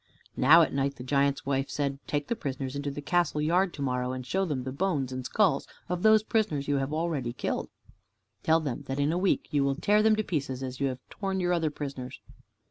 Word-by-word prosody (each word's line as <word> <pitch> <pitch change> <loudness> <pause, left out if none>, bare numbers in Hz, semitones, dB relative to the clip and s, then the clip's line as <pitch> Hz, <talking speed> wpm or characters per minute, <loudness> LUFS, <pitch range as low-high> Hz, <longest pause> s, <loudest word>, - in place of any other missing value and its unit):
Now 160 +6 +7
at - - -1
night 140 0 0
the 125 - -9
giant's 140 +1 +1
wife 135 0 0
said: 140 -1 -2
"Take 145 -1 -1
the 235 - -1
prisoners 135 - -4
into 140 0 -2
the 145 +1 -6
castle 175 -1 +1
yard 175 +5 +2
to 140 - -4
morrow, 125 -1 -1
and 130 -1 -5
show 190 +7 0
them 145 -7 -2
the 130 - -4
bones 140 -4 -1
and 130 0 -4
skulls 175 - +2 0.2
of 180 0 -2
those 215 0 +6
prisoners 210 -11 0
you 145 -1 +2
have 135 +1 -2
already 155 -7 -1
killed. - - -3 0.7
Tell 160 +1 +3
them 140 -7 -3
that 135 +1 -3
in 145 +2 +2
a 170 - 0
week 190 0 +1
you 145 -2 +2
will 140 0 +1
tear 210 +8 +3
them 220 0 +5
to 215 - 0
pieces, 135 -8 -3
as 130 0 -5
you 140 - +1
have 130 -1 -6
torn 195 -2 -2
your 180 -1 +1
other 165 -3 +1
prisoners." 135 -4 -6
145 Hz, 230 wpm, -28 LUFS, 135-175 Hz, 0.7 s, Now